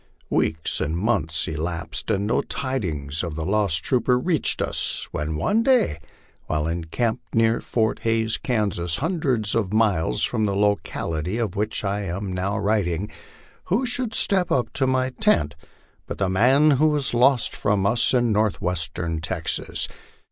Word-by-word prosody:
Weeks 80 0 0
and 80 +3 -1
months 85 -6 0
elapsed, 80 +1 -4
and 100 +1 0
no 110 - +1
tidings 80 - -3
of 85 -3 -4
the 80 0 -4
lost 95 -5 +1
trooper 125 0 +2
reached 160 +2 0
us, - - 0
when 75 +1 -3
one 205 - +1
day, 235 - +2 0.5
while 75 -1 -1
encamped 85 +8 -3
near 115 0 +3
Fort 110 -2 0
Hays, 115 -1 0
Kansas, 100 -8 -1
hundreds 135 - -1
of 105 -5 0
miles 100 - +1
from 110 - 0
the 100 -1 -1
locality 100 -3 -1
of 110 -6 -2
which 105 +2 -2
I 100 +1 -1
am 95 0 -4
now 95 +3 -1
writing, 100 -3 0 0.5
who 225 +9 +1
should 245 -2 -2
step 190 -3 +2
up 125 - 0
to 135 - +1
my 130 0 +1
tent 170 - +2 0.5
but - - -5
the 95 -2 0
man 130 +10 +4
who 155 - +6
was 150 -4 +1
lost 125 +1 +3
from 100 -2 0
us 115 +4 +4
in 120 -3 +2
northwestern 85 -5 0
Texas. 85 - -2
105 Hz, 155 wpm, -23 LUFS, 85-125 Hz, 0.5 s, who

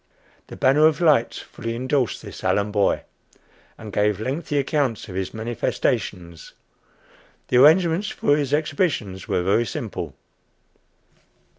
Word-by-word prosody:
"The - - -9
Banner 145 +4 +4
of 155 -2 0
Light" 150 -9 +3
fully 115 0 -6
indorsed 130 0 -1
this - - -10
Allen 105 +1 +1
boy, 100 -1 +1 0.7
and 105 -2 -10
gave 105 -1 +1
lengthy 145 +6 -3
accounts 140 -4 0
of 95 - -9
his 95 0 -3
manifestations. 90 -6 -3 1.0
The 125 - +3
arrangements 165 +7 +5
for 145 - +1
his 145 -2 -2
exhibition 145 - -1
were 90 - 0
very 105 +5 +2
simple. - - -5
125 Hz, 125 wpm, -23 LUFS, 105-150 Hz, 1.0 s, arrangements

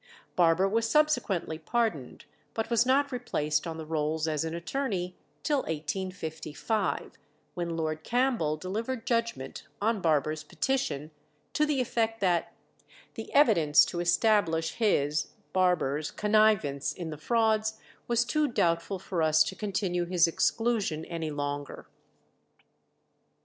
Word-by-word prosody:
Barber 175 +2 +4
was 225 +3 0
subsequently 220 - +1
pardoned, 185 - -2 0.3
but 225 +1 -2
was 235 +1 +3
not 280 +2 +3
replaced 155 - -1
on 165 -1 -5
the 160 - -6
rolls 155 0 -1
as 155 -1 0
an 165 0 -3
attorney 180 -1 -3 0.3
till 295 -2 +2
1855, 160 - -3 0.3
when 170 -1 -3
Lord 155 -1 -2
Campbell 240 - +1
delivered 225 +8 -4
judgment 230 - -2
on 220 0 0
Barber's 155 -1 +1
petition, 155 - -2 0.4
to 300 - +2
the 295 -3 +1
effect 225 -2 -1
that 175 -4 +1 0.6
"the - - -8
evidence 170 - +6
to 175 - -4
establish 175 -3 +2
his 150 -9 +1 0.3
(Barber's) 170 -6 +1
connivance 210 -10 +2
in 170 -3 -6
the 150 - -6
frauds 220 +1 +1 0.3
was 240 0 +2
too 305 +3 +1
doubtful 180 -5 0
for 180 -2 -3
us 155 0 +5
to - - -5
continue 195 -4 -1
his 175 -1 +4
exclusion 205 -3 0
any 165 -2 -4
longer." 145 -1 -4
180 Hz, 125 wpm, -29 LUFS, 160-225 Hz, 0.6 s, evidence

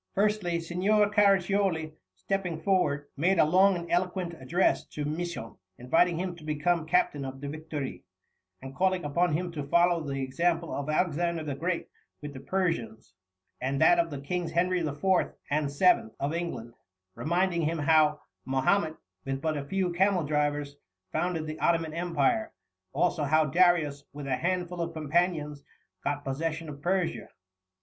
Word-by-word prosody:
Firstly, 200 -4 +1
Signor 200 +5 +2
Caraccioli, 195 -5 +2 0.2
stepping 170 - -2
forward, 160 -5 +1
made 175 +6 +2
a - - +6
long 190 +4 +5
and 170 -1 -6
eloquent 180 0 0
address 170 +5 +1
to 150 - -5
Misson, 155 -6 -4 0.2
inviting 165 +7 +2
him 180 0 -3
to 160 - -13
become 155 +2 0
captain 160 -4 +2
of 135 0 -6
the 140 - -6
Victoire, 150 -2 -5 0.6
and 135 0 -8
calling 185 0 +1
upon 160 +3 +1
him 175 +3 -1
to 155 -3 -5
follow 170 +2 +3
the 135 -3 -3
example 170 +5 0
of 145 +1 -3
Alexander 170 +1 0
the 145 -2 -3
Great 170 +5 -2 0.3
with 145 -1 -7
the 130 - -8
Persians, 135 - -2 0.5
and 135 +2 -1
that 175 +2 +6
of 170 0 +2
the 145 -3 -6
Kings 175 +5 -3
Henry 180 +2 +2
IV. 150 -2 -4 0.5
and 145 -1 0
VII. 145 -5 +3
of 140 +3 -1
England, 165 -9 -4 0.4
reminding 170 - 0
him 165 +1 0
how 150 0 +3 0.2
Mahomet, 155 +6 +1 0.3
with 135 0 -3
but 155 +2 -1
a 145 - -3
few 185 +3 -1
camel 190 0 +2
drivers, 145 -1 -1 0.3
founded 175 -3 -1
the 155 0 -6
Ottoman 165 -2 +1
Empire, 170 +4 0 0.4
also 175 -3 +1
how 155 +2 +3
Darius, 160 -3 +3
with 145 -1 -7
a 130 -2 0
handful 180 +1 -2
of 170 0 -3
companions, 155 -2 -1 0.4
got 145 0 -2
possession 160 +4 -3
of 140 -1 -9
Persia. 180 0 -1
165 Hz, 155 wpm, -28 LUFS, 145-180 Hz, 0.6 s, a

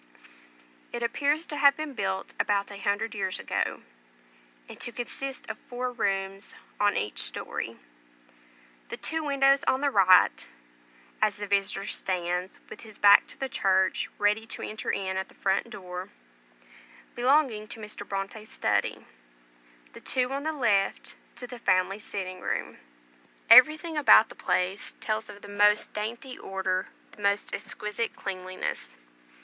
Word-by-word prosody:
It 240 - -4
appears 290 +7 0
to 295 - -6
have 280 0 +6
been 310 -2 -5
built 195 -5 -3
about 200 0 +1
a 200 - -8
hundred 205 +3 -1
years 190 -3 -2
ago, - - -2 0.8
and - - -11
to 240 - -4
consist 260 +2 -6
of - - -6
four 250 +1 -3
rooms 195 -3 -2 0.2
on 205 0 +3
each 105 - -3
story; - - -5 1.1
the - - -5
two 320 0 -2
windows 275 -1 +3
on 260 - +3
the 285 -1 +2
right 185 - +5 0.7
(as 210 -2 +2
the 205 - -4
visitor 200 0 0
stands 180 -2 -2
with - - -10
his 215 -2 -13
back 200 0 +7
to - - -10
the 270 - -2
church, 190 -6 +1
ready 210 +2 +1
to - - -7
enter 215 - -5
in 190 -1 -1
at 190 - -2
the - - -19
front 195 0 0
door) 180 -1 -7 1.0
belonging 245 -4 +2
to 225 - -8
Mr. 210 -1 -9
Bronte's 200 +2 -5
study, - - 0 0.9
the - - -12
two 250 0 0
on 275 - -2
the 315 +2 -1
left 210 -10 0 0.2
to 250 - -7
the 245 0 -9
family 185 -1 +2
sitting 185 -3 -5
room. - - -3 0.7
Everything 310 +6 +7
about 225 -4 +7
the - - -10
place 185 +2 -1
tells 215 0 -2
of 205 0 -11
the - - -9
most 205 +1 +3
dainty 235 +5 -5
order, 190 -1 -2 0.2
the - - -15
most 200 0 +1
exquisite 210 +2 -3
cleanliness. 185 - -5
210 Hz, 150 wpm, -28 LUFS, 195-250 Hz, 1.1 s, back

